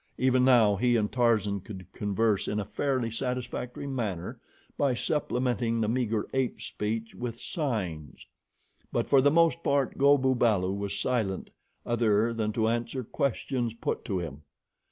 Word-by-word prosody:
Even 130 0 +3
now 115 -6 +5
he 120 +3 +2
and 105 -2 +1
Tarzan 110 -5 +2
could 95 -1 -9
converse 105 0 0
in 105 - -1
a 105 - -2
fairly 130 +1 -1
satisfactory 125 +1 -4
manner 110 -11 -3 0.4
by 140 -3 +1
supplementing 120 -5 0
the 110 - +1
meager 115 -2 0
ape 130 -2 0
speech 110 +2 -4
with 120 -1 -5
signs; 95 - -4 0.7
but - - 0
for 135 -2 +5
the 145 - +5
most 165 +2 +3
part, 140 -4 0
Go 140 +1 +6
bu 130 -1 +2
balu 105 -7 +2
was 100 0 -3
silent 110 -7 -1 0.3
other 115 -1 +2
than 110 -2 -1
to 110 -1 +1
answer 120 +3 -1
questions 120 -1 -2
put - - -3
to 95 - -1
him. 75 -5 -5
115 Hz, 155 wpm, -28 LUFS, 105-130 Hz, 0.7 s, Go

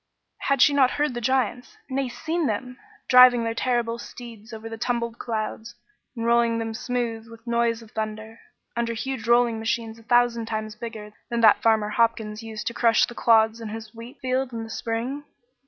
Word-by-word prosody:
Had 275 -2 +3
she 290 - +5
not 270 -3 +5
heard 295 -1 -1
the 240 - -4
giants 255 - -1
nay, 270 -1 -2
seen 325 +4 -2
them 250 +4 -4 0.3
driving 250 -2 +7
their 230 0 -1
terrible 235 -1 -1
steeds 235 -2 -10
over 220 0 -7
the 225 - -6
tumbled 235 0 -2
clouds, 220 0 -4 0.4
and 230 -1 -3
rolling 235 0 +3
them 225 -1 -3
smooth 230 -1 -3
with 230 0 -14
noise 235 -1 0
of 220 - -17
thunder, 220 +1 -5 0.4
under 235 -1 -1
huge 245 -1 -4
rolling 235 -1 +3
machines 225 0 -2
a - - -17
thousand 240 -1 +2
times 215 -1 -4
bigger 215 -2 -8 0.2
than 235 -1 -1
that 220 -2 +6
Farmer 220 -2 +3
Hopkins 220 -1 0
used 220 -1 -7
to 235 - -2
crush 230 -2 +4
the 240 - -10
clods 225 -1 +3
in 220 - -5
his 220 0 -8
wheat 230 +3 -11
field 260 0 -1
in 230 -1 -5
the 225 - -9
spring? 240 +6 -3
230 Hz, 190 wpm, -25 LUFS, 225-245 Hz, 0.4 s, driving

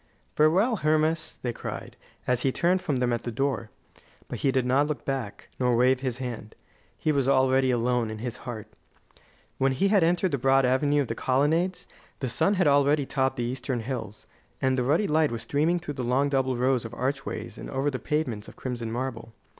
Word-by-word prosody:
"Farewell, 190 +10 +3
Hermas," 155 0 +1
they 120 -2 -1
cried, - - -7 0.3
as 125 -1 +1
he 135 - +2
turned 180 +6 +1
from 145 -6 -1
them 125 -1 +1
at 120 - -1
the 120 - -4
door. 125 -2 -1 0.6
But - - -5
he 135 - +2
did 130 -1 +1
not 135 +4 +3
look 150 -2 -4
back, 130 -7 -4
nor 125 -2 +2
wave 130 +1 +4
his 130 -2 -3
hand. 120 -4 -6 0.4
He 155 - 0
was 135 -3 +1
already 130 -1 +3
alone 120 -1 +1
in 110 - -5
his 120 +2 -5
heart. 115 -5 -7 0.9
When 135 0 +2
he 195 +9 +1
entered 180 -2 +3
the 140 - -1
broad 135 +1 +4
Avenue 145 +3 +2
of - - -7
the 115 - -2
Colonnades, 155 +10 +1 0.3
the 130 - -2
sun 195 - +2
had 185 -2 +2
already 145 0 +3
topped 135 0 0
the 120 - -2
eastern 125 0 -3
hills, 110 -4 -6 0.3
and 130 0 +1
the 130 - 0
ruddy 150 +11 +2
light 155 0 +3
was 115 -1 -4
streaming 150 +8 +1
through 165 -4 -5
the 130 - -4
long 130 +4 +1
double 130 -2 0
row 130 +2 +2
of 120 -2 -3
archways 135 +2 -3
and - - -7
over 135 +2 -1
the 130 - -4
pavements 125 -9 -2
of - - -12
crimson 120 -3 -4
marble. 115 -2 -4
130 Hz, 200 wpm, -26 LUFS, 125-145 Hz, 0.9 s, wave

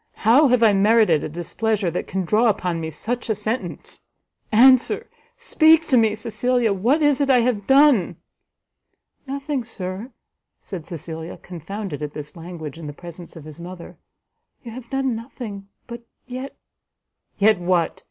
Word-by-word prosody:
how 265 +7 +6
have 250 -2 +3
I 215 -2 +6
merited 205 -5 +4
a - - -4
displeasure 190 +4 -2
that 175 - -4
can 190 -1 -3
draw 215 +6 +3
upon 180 -5 -1
me 160 - -4
such 230 - -4
a 220 - +1
sentence? 210 -3 -5 0.5
Answer, 260 - +5 0.3
speak 320 -6 +4
to 265 - +4
me, 220 -2 +3
Cecilia, 235 0 0
what 245 - +1
is 290 -1 +3
it 280 - +1
I 250 -2 +5
have 230 -5 -1
done?" 270 - +4 1.1
"Nothing, 280 -1 -3
Sir," 200 +1 -7 0.5
said 175 -5 -8
Cecilia, 160 0 -7
confounded 180 -1 -7
at 150 0 -5
this 150 +3 -8
language 165 -3 -8
in 160 - -7
the 145 - -6
presence 170 +2 -11
of 160 -3 -11
his 155 +1 -11
mother, 175 0 -10 0.7
"you 235 - -8
have 235 0 -10
done 270 -3 -1
nothing, 220 -4 -8 0.2
but 235 0 -9 0.2
yet 255 +2 -7 0.4
" - - -53
"Yet 210 -1 +4
what? 175 -2 0
215 Hz, 160 wpm, -22 LUFS, 175-250 Hz, 1.1 s, how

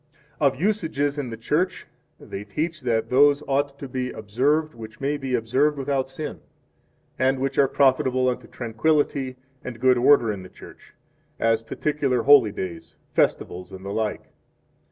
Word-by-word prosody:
1 140 -3 +3
Of - - -14
Usages 160 -7 0
in 130 -4 -3
the 115 - -6
Church 165 +11 -1 0.3
they 100 - -7
teach 155 +10 -3
that 115 -2 -1
those 145 +3 +5
ought 140 0 0
to 140 - -7
be 130 0 -3
observed 135 +10 0
which 110 -1 -11
may 140 +2 0
be 135 -3 -2
observed 130 +6 +1
without 135 -1 -1
sin, 135 - -6 0.8
and 130 +1 +2
which 135 +1 -1
are 140 - +5
profitable 130 -2 +2
unto 125 - -2
tranquillity 130 +2 0 0.3
and 120 -2 -7
good 130 0 +4
order 120 -3 +5
in 100 -3 -5
the 90 - -11
Church, - - -15 0.4
as 115 0 +2
particular 135 0 -1
holy 135 -6 +6
days, 90 -5 -7 0.2
festivals, 90 0 0
and 95 0 -10
the 100 - -4
like. 110 -1 -3
130 Hz, 160 wpm, -24 LUFS, 115-145 Hz, 0.8 s, holy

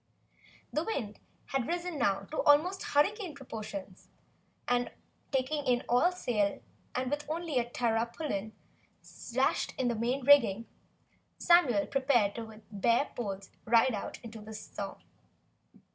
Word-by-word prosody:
The 305 - +1
wind 230 - -4 0.3
had 265 -3 -1
risen 345 -2 -2
now 200 -5 +1 0.2
almost 340 +7 +5
to - - -5
hurricane 355 +3 +1
proportions, 210 -7 -8 0.6
and 245 0 +1 0.4
taking 285 +2 0
in 245 -1 +2
all 250 +9 +4
sail 220 - 0 0.4
and 255 +1 -1
with 295 0 -1
only 320 -4 -1
a 240 0 -2
tarpaulin 230 -1 -1 0.8
lashed - - +1
in 255 -2 +1
the 235 - 0
main 245 +4 -1
rigging, 230 -7 +6 0.7
Samuel 280 - +4
prepared 260 -7 +2
with 220 -1 -9
bared 230 +7 +1
poles 195 -4 -4
to - - -34
ride 235 +2 +5
out 205 - -4
the 220 -1 -9
storm. 215 - -6
245 Hz, 130 wpm, -31 LUFS, 220-290 Hz, 0.8 s, rigging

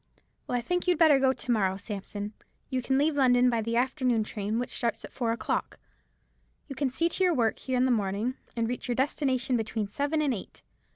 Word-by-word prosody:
"Well, 245 - 0
I - - -1
think 355 +8 -1
you'd 355 -2 +3
better 305 -4 +6
go 265 -1 +4
to 260 - -3
morrow, 190 -4 +2
Sampson. 205 0 -6 0.4
You 260 -1 0
can 265 +2 +1
leave 295 +2 +2
London 250 -2 +4
by 230 -1 +1
the 230 +1 -2
afternoon 250 -2 +1
train, 210 +1 -3
which 245 - -2
starts 235 -2 -2
at - - -13
four 235 -3 -1
o'clock. 230 - -2 0.9
You 280 - -6
can 280 -1 0
see 330 +6 +1
to 360 +2 -1
your 360 -3 +3
work 230 -3 +1
here 260 -1 -2
in 250 - +3
the 260 - +2
morning, 210 +2 0 0.2
and 230 -1 0
reach 245 +2 -4
your 245 - 0
destination 260 -2 +1
between 220 -1 -2
seven 285 +8 -1
and 280 -3 +1
eight. 200 - -8
245 Hz, 220 wpm, -28 LUFS, 225-270 Hz, 0.9 s, better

